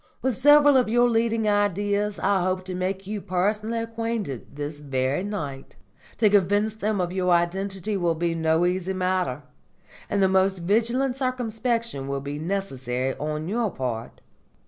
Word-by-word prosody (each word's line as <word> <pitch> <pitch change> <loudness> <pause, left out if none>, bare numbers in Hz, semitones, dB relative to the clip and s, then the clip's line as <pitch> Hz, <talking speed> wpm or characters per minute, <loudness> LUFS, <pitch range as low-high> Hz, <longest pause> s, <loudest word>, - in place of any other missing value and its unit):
With 260 -3 +1
several 290 +1 +6
of 250 -4 +2
your 240 +2 +4
leading 225 -1 +1
Ideas 205 0 +1
I 195 -1 +1
hope 185 +1 -1
to 185 - -5
make 185 +1 -3
you 205 +1 -4
personally 210 +5 -1
acquainted 225 - -4
this 145 +1 -5
very 135 +2 -1
night. 145 -10 -5 0.4
To 215 - +4
convince 205 +2 +3
them 215 -1 -1
of 180 0 -1
your 185 -1 0
identity 190 +4 0
will 170 -3 +1
be 170 +1 0
no 160 +1 +2
easy 185 +1 -1
matter, 180 -7 -1 0.7
and 205 - 0
the - - +5
most 190 0 +2
vigilant 235 +7 +1
circumspection 235 - -2
will 140 0 -2
be 145 +2 -5
necessary 135 -8 -2
on 155 +1 -3
your 225 +2 0
part. 125 -8 -5
190 Hz, 155 wpm, -25 LUFS, 165-220 Hz, 0.7 s, several